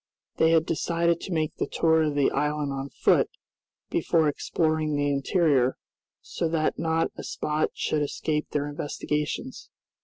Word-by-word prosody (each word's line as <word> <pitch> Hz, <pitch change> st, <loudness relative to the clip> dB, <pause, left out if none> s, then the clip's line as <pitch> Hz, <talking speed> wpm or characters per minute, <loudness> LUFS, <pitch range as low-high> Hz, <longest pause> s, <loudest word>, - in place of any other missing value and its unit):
They 160 Hz, -, +4 dB
had 165 Hz, -1 st, +4 dB
decided 170 Hz, +1 st, 0 dB
to 190 Hz, -, -6 dB
make 155 Hz, -2 st, -1 dB
the -, -, -1 dB
tour 160 Hz, -1 st, +3 dB
of 150 Hz, -2 st, 0 dB
the 145 Hz, -1 st, +3 dB
island 150 Hz, -1 st, -1 dB
on 135 Hz, 0 st, -4 dB
foot, -, -, +2 dB, 0.6 s
before 160 Hz, -2 st, +2 dB
exploring 155 Hz, +1 st, 0 dB
the 145 Hz, 0 st, +1 dB
interior; 140 Hz, -3 st, +2 dB, 0.4 s
so 165 Hz, -, -3 dB
that 160 Hz, -1 st, 0 dB
not 165 Hz, 0 st, +1 dB
a -, -, -5 dB
spot 155 Hz, +1 st, -1 dB
should 155 Hz, -, 0 dB
escape 150 Hz, +1 st, -2 dB
their 145 Hz, -1 st, -1 dB
investigations. 150 Hz, +1 st, -3 dB
155 Hz, 150 wpm, -26 LUFS, 145-160 Hz, 0.6 s, They